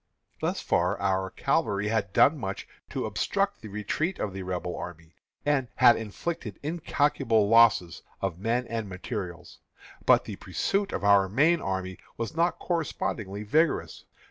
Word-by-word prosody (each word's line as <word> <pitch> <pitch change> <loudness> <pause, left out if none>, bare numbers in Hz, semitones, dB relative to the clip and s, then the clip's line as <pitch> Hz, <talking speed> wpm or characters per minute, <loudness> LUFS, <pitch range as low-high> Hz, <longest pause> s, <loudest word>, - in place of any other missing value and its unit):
Thus - - -1
far 90 +4 +1
our 95 -1 0
cavalry 105 - 0
had 105 -3 0
done 145 +9 +5
much 95 -4 -5 0.2
to - - -3
obstruct 200 0 -1
the 110 - -8
retreat 105 - -2
of 100 - -3
the 95 - -5
Rebel 90 -1 -3
army, 85 -1 -8 0.3
and 145 -3 +2
had 120 - +7
inflicted 115 - -5
incalculable 145 -8 +1
losses 115 -6 +4 0.2
of 95 -3 -3
men 115 +5 0
and 115 -3 -4
materials. 90 -2 -6 0.5
But - - +6
the - - -6
pursuit 200 +1 -1
of - - -3
our 100 -1 +5
main 155 - +3
army 95 -1 -3 0.2
was 115 +7 -4
not 170 +2 +2
correspondingly 110 - -3
vigorous. 155 +9 0
105 Hz, 145 wpm, -27 LUFS, 95-145 Hz, 0.5 s, had